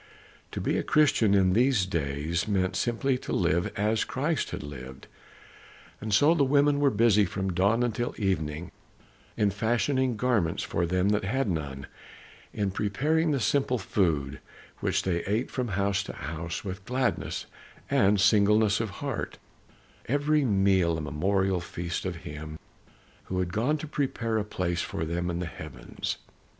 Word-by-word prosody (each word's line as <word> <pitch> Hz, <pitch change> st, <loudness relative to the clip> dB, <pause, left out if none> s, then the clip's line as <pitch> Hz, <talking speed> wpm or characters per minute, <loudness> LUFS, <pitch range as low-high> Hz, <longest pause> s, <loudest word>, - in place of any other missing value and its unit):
'" -, -, -28 dB
To -, -, -3 dB
be -, -, 0 dB
a -, -, -1 dB
Christian 140 Hz, -9 st, +3 dB
in 95 Hz, -2 st, +4 dB
these 120 Hz, -3 st, +3 dB
days 80 Hz, 0 st, -2 dB
meant 95 Hz, -3 st, 0 dB
simply 125 Hz, +2 st, 0 dB
to -, -, -7 dB
live 85 Hz, -1 st, +1 dB
as 110 Hz, +2 st, +1 dB
Christ 150 Hz, +4 st, -1 dB
had -, -, -5 dB
lived. 65 Hz, -2 st, -9 dB, 1.0 s
And 110 Hz, +1 st, -4 dB
so 145 Hz, +11 st, +5 dB
the 160 Hz, -4 st, +3 dB
women 145 Hz, +1 st, +3 dB
were 145 Hz, -1 st, +4 dB
busy 105 Hz, -3 st, +4 dB
from 95 Hz, 0 st, -2 dB
dawn 100 Hz, +7 st, +2 dB
until 120 Hz, 0 st, -2 dB
evening 80 Hz, -5 st, -2 dB, 0.7 s
in 105 Hz, -2 st, +2 dB
fashioning 120 Hz, +4 st, +1 dB
garments 110 Hz, -8 st, +1 dB
for 85 Hz, 0 st, -1 dB
them 90 Hz, +3 st, +1 dB
that 105 Hz, -1 st, +1 dB
had 130 Hz, +6 st, 0 dB
none; 75 Hz, -7 st, -3 dB, 0.7 s
in 100 Hz, -3 st, -1 dB
preparing 145 Hz, -, +1 dB
the 140 Hz, -3 st, +1 dB
simple 130 Hz, 0 st, +1 dB
food, 80 Hz, -, 0 dB, 0.4 s
which -, -, 0 dB
they 85 Hz, -2 st, 0 dB
ate 105 Hz, +5 st, -1 dB
from 125 Hz, -2 st, -2 dB
house 100 Hz, -1 st, 0 dB
to -, -, -6 dB
house 80 Hz, +5 st, -5 dB
with 95 Hz, 0 st, -5 dB
gladness 125 Hz, +1 st, -1 dB, 0.4 s
and 100 Hz, +1 st, +3 dB
singleness 105 Hz, +1 st, +4 dB
of 110 Hz, -2 st, -1 dB, 0.2 s
heart, -, -, -3 dB, 0.7 s
every 145 Hz, +3 st, +2 dB
meal 95 Hz, -7 st, +3 dB
a -, -, -3 dB
memorial 95 Hz, +6 st, 0 dB
feast 85 Hz, +1 st, -4 dB
of 90 Hz, -1 st, -2 dB
him 75 Hz, +1 st, -7 dB, 0.7 s
who 95 Hz, -, -4 dB
had 90 Hz, -1 st, -1 dB
gone 125 Hz, +9 st, +1 dB
to 155 Hz, -, -6 dB
prepare 120 Hz, -7 st, -1 dB
a -, -, -1 dB
place 85 Hz, -4 st, -2 dB
for 80 Hz, -, -3 dB
them 85 Hz, +2 st, -2 dB
in 85 Hz, -, -2 dB
the 90 Hz, -, -2 dB
heavens. 75 Hz, -3 st, -6 dB
100 Hz, 160 wpm, -28 LUFS, 85-120 Hz, 1.0 s, so